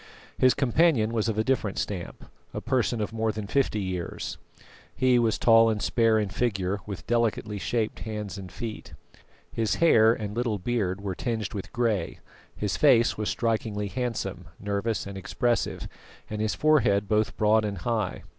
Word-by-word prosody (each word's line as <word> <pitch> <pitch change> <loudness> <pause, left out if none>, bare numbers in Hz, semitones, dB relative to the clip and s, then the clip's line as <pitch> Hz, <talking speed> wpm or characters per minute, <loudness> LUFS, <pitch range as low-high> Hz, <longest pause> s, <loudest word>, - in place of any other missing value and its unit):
His 130 -1 +4
companion 135 -4 +2
was 115 -1 0
of 110 - -2
a 110 - +2
different 110 -5 0
stamp; 95 -4 -4 0.3
a - - -1
person 120 -2 0
of 105 - -3
more 110 -1 0
than 105 -1 -5
fifty 120 -1 0
years, 90 -3 -4 0.6
he 130 -1 +3
was 115 -2 +2
tall 115 -1 +6
and 110 -1 0
spare 115 0 +2
in 105 -2 0
figure, 100 -3 -1
with 95 -7 -6
delicately 110 -3 0
shaped 110 +5 -1
hands 105 -3 -5
and 95 -2 -8
feet. 115 -3 -7 0.6
His 110 -2 0
hair 115 -10 +5
and 105 -2 -3
little 120 -3 0
beard 100 -2 -1
were 100 -2 -3
tinged 110 -1 -3
with 100 - -6
grey, 110 -8 -1 0.4
his 105 -2 -2
face 125 -5 +5
was 105 -1 -2
strikingly 110 -3 -1
handsome, 110 -6 -3
nervous 105 +2 -2
and 100 -1 -6
expressive, 120 +5 -1 0.4
and 105 0 -3
his 110 -1 0
forehead 115 -10 +3
both 105 -1 +1
broad 110 +1 +3
and 100 -2 -3
high. 110 0 -2
110 Hz, 165 wpm, -27 LUFS, 100-120 Hz, 0.6 s, tall